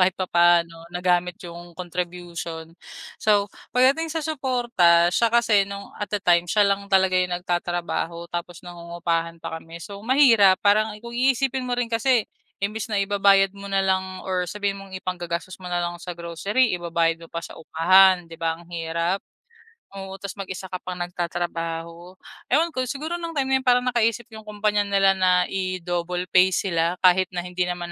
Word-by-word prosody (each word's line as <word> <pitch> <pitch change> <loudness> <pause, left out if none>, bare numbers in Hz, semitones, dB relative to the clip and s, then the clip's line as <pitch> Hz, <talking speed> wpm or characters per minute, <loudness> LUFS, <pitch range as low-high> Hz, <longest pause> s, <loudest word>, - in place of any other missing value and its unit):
kahit 185 0 +3
papaano 170 -2 +2
nagamit 180 0 +1
yung 175 0 -10
contribution. 170 -2 -6 0.4
So 205 -1 +2 0.2
pagdating 270 +6 +3
sa 320 - -1
suporta, 240 - +2
siya 230 - +3
kasi 225 -4 +4
nung 200 0 -8
at 205 - -3
the 205 - 0
time 175 0 +3
siya 210 +4 +4
lang 200 0 0
talaga 190 -1 +3
yung 180 -1 0
nagtatrabaho 175 -1 -3
tapos 175 0 -5
nangungupahan 170 -1 -3
pa 160 - -5
kami 165 +1 -11
so 200 +1 -8
mahirap, 230 -7 +5
parang 210 +1 +3
kung 235 - -8
iisipin 260 +1 +1
mo 245 - -1
rin 240 - -1
kasi, 230 +1 +2 0.4
imbes 210 +2 -2
na 205 - +1
ibabayad 195 -1 +4
mo 200 0 -9
na 195 0 +1
lang 190 -1 -1
or 185 -1 -1
sabihin 200 +2 -3
mong 195 -1 -11
ipang-gagastos 175 -1 -5
mo 185 - -11
nalang 175 -1 -2
sa 175 +1 -7
grocery 185 +9 0
ibabayad 165 -1 0
mo - - -10
pa 170 - -5
sa - - -10
upahan 180 +2 +4
di 165 - -10
ba 165 -1 0
ang 170 - -16
hirap? 170 +2 -1 0.8
Oo, 195 0 -7
tapos 200 0 -7
mag-isa 190 -1 -6
ka 185 - -4
pang 180 0 -6
nagtatrabaho. 170 0 -4 0.4
Ewan 325 +6 +3
ko, 255 -4 -2
siguro 310 +7 -4
nung 335 -1 -6
time 265 -2 0
na - - +5
yun 260 - -12
para 250 0 +4
nakaisip 235 -2 +1
yung 220 0 -10
kumpanya 210 -1 0
nila 195 -1 +4
na 180 -1 +3
i-double 180 -1 -3
pay 185 0 +6
sila 170 -2 0
kahit 185 0 +5
na 175 - -2
hindi 180 0 -2
naman 175 -1 -4
185 Hz, 175 wpm, -23 LUFS, 175-205 Hz, 0.8 s, pay